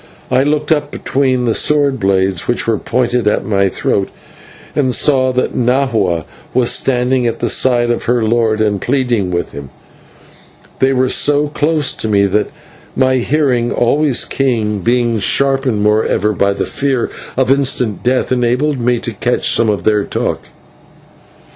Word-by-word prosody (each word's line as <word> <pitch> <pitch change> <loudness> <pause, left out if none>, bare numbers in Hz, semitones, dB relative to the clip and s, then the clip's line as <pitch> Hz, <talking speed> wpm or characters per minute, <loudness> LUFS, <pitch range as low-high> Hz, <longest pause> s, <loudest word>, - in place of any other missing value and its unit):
I 130 - +3
looked 150 +2 -1
up 150 -2 +1
between 130 -3 -1
the 115 - +1
sword 145 -2 +2
blades 95 -2 0
which 120 - 0
were 115 -3 0
pointed 120 -2 -1
at 105 - 0
my 100 -2 +1
throat, 95 +1 -1 0.7
and 130 -4 +1
saw 130 -3 +2
that 125 - -1
Nahua 115 - 0 0.3
was 125 -2 +2
standing 125 -1 0
at 115 - -2
the - - -1
side 120 -2 +2
of 120 - -3
her 120 -1 +1
lord, 110 -1 +1
and 105 -3 0
pleading 125 -7 0
with 85 -1 -3
him. 70 -1 -9 1.1
They 130 0 +3
were 130 -1 +1
so 145 +3 +2
close 150 -2 0
to - - -4
me 100 -2 +2
that 105 +2 0 0.5
my 130 0 +2
hearing, 125 -3 0
always 135 +2 +1
keen, 110 -6 -1
being 120 +2 0
sharpened 135 -1 +1
moreover 105 0 +1
by 100 0 +1
the - - -3
fear 135 -3 -2 0.3
of 130 0 +2
instant 130 -6 0
death, 125 +1 0
enabled 125 +3 0
me 120 0 +1
to 115 0 -5
catch 120 +4 0
some 115 - +2
of 105 - -1
their 105 -1 +2
talk. - - -3
125 Hz, 160 wpm, -15 LUFS, 110-135 Hz, 1.1 s, I